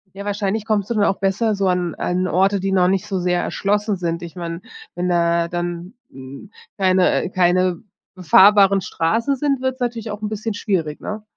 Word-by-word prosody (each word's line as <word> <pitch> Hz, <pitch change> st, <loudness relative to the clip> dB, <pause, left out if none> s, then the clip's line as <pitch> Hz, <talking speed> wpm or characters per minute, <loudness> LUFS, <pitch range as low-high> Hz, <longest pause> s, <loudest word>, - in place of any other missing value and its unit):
Ja, 200 Hz, +1 st, -8 dB
wahrscheinlich 205 Hz, +1 st, -2 dB
kommst 215 Hz, -1 st, -1 dB
du -, -, 0 dB
dann 210 Hz, -2 st, +2 dB
auch 195 Hz, -, 0 dB
besser 200 Hz, +3 st, +1 dB
so 195 Hz, -1 st, 0 dB
an 180 Hz, -2 st, -1 dB
an 180 Hz, +1 st, -1 dB
Orte, 195 Hz, +2 st, +2 dB
die 195 Hz, +1 st, -2 dB
noch 185 Hz, -2 st, +3 dB
nicht 190 Hz, 0 st, 0 dB
so 195 Hz, -, -2 dB
sehr 180 Hz, -1 st, 0 dB
erschlossen 205 Hz, +1 st, -1 dB
sind. 170 Hz, -2 st, -3 dB
Ich 170 Hz, -1 st, -9 dB
meine, 170 Hz, -1 st, -5 dB, 0.3 s
wenn 180 Hz, +1 st, -2 dB
da 170 Hz, -1 st, +1 dB
dann, 175 Hz, +3 st, -5 dB, 0.2 s
hm, 135 Hz, +9 st, -11 dB, 0.3 s
keine 185 Hz, -2 st, +2 dB
keine 185 Hz, 0 st, +1 dB, 0.3 s
befahrbaren 195 Hz, +2 st, +5 dB
Straßen 225 Hz, +13 st, -1 dB
sind, 275 Hz, -1 st, -1 dB
wird's 260 Hz, 0 st, -2 dB
natürlich 235 Hz, -3 st, -3 dB
auch 210 Hz, 0 st, -6 dB
'n 210 Hz, -, -3 dB
bisschen 215 Hz, +1 st, -4 dB
schwierig, 175 Hz, -7 st, -2 dB
ne? 210 Hz, 0 st, -6 dB
190 Hz, 190 wpm, -20 LUFS, 175-210 Hz, 0.3 s, befahrbaren